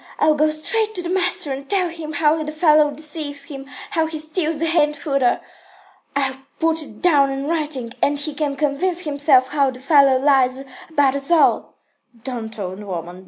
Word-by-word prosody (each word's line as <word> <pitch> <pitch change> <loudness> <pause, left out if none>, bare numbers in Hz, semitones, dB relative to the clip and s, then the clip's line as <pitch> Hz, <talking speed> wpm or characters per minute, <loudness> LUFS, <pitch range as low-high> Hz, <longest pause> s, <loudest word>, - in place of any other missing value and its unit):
I'll 310 0 +3
go 305 +1 +2
straight 435 +8 0
to 360 - -2
the 345 - -4
master 360 -6 +1
and 275 +1 -8
tell 370 -3 +1
him 325 -2 -7
how 300 +2 +2
the 305 - -5
fellow 305 -1 +4
deceives 295 -1 -3
him, 275 -1 -9 0.2
how 325 -5 +1
he 315 0 -5
steals 310 +1 -2
the 330 - -1
hay 330 -1 +3
and 295 0 -2
fodder. 275 -6 0 0.7
I'll 270 -2 -1 0.2
put 325 0 +1
it 220 -8 -10
down 290 -6 +4
in 270 0 -4
writing, 300 -7 -3
and 290 0 +2
he 290 +1 -4
can 290 -1 -2
convince 305 +6 0
himself 285 -4 +2
how 280 -2 +2
the 255 -1 -8
fellow 275 -1 +4
lies 265 -1 +2 0.3
about 285 -4 +2
us 275 0 -1
all." 340 -2 +3 0.5
"Don't, 230 -4 -6
old 190 0 -6
woman. 175 -2 -6
295 Hz, 190 wpm, -20 LUFS, 270-320 Hz, 0.7 s, fellow